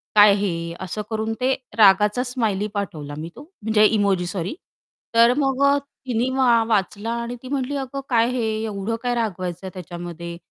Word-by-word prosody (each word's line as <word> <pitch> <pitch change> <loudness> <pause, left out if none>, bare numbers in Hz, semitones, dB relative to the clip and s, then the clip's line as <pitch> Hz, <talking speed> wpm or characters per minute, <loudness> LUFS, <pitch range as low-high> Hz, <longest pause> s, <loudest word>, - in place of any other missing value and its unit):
काय 205 -1 +8
हे?" 170 -4 -2
असं 210 +4 -4
करून 220 0 -2
ते 265 +1 +3 0.2
रागाचा 210 +3 +5
स्माइली 220 -5 -1
पाठवला 155 -8 -4
मी 160 +2 -5
तो, - - -10 0.2
म्हणजे 215 0 +4
इमोजी 200 -4 +2
सॉरी. 180 - -3 0.6
तर 235 +1 +6
मग 270 -1 +1
अ, 280 0 +5 0.3
तिनी 245 +1 0
वा 235 -3 +4
वाचला 210 +1 0
आणि 240 +1 -4
ती 255 - -8
म्हटली, 275 0 -2
"अगं, 275 0 -4
काय 230 -2 +3
हे 250 -2 -1 0.2
एवढं 210 +1 -3
काय 245 -1 0
रागवायचं 185 -4 -3
त्याच्यामध्ये? 170 -1 -7
215 Hz, 165 wpm, -22 LUFS, 190-245 Hz, 0.6 s, काय